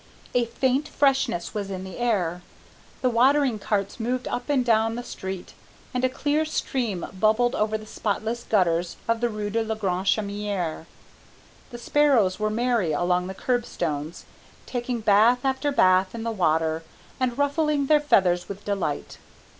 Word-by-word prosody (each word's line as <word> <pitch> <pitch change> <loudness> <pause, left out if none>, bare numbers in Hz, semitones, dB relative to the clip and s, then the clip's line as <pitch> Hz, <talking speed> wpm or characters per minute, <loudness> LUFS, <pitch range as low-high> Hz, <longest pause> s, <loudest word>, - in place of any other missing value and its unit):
A 245 -1 +2
faint 260 +5 0
freshness 270 -10 +1
was 205 -2 -3
in 185 -1 -5
the 190 +2 -8
air. 185 -8 0 0.6
The 255 - +4
watering 260 0 +3
carts 200 +1 -2
moved 245 +2 -2
up 245 - -4
and 265 -4 +2
down 225 -1 +2
the 245 - -5
street, 190 -6 -7 0.4
and 250 0 -1
a 255 - +3
clear 290 +4 0
stream 245 - -2
bubbled 220 +4 +3
over 215 +1 0
the 215 - -11
spotless 220 +2 -2
gutters 175 -6 +1
of 230 0 +1
the 240 - +2
rue 210 -1 -4
de 230 +2 +1
la 220 0 -2
Grande 190 -3 -2
Chaumière. 200 -6 -1 0.8
The 240 - -8
sparrows 240 -7 +2
were 215 0 +1
merry 230 -6 +1
along 180 +3 +1
the 190 - -6
curb 245 +3 0
stones, 155 -3 -4 0.4
taking 245 -1 -3
bath 220 +5 +4
after 270 +2 0
bath 185 -5 +3
in 225 - -5
the 230 - -1
water 160 -5 +1 0.4
and 250 -2 0
ruffling 285 0 +1
their 300 +1 +4
feathers 180 -11 +2
with 200 +1 -8
delight. 195 -8 -3
220 Hz, 160 wpm, -25 LUFS, 190-250 Hz, 0.8 s, The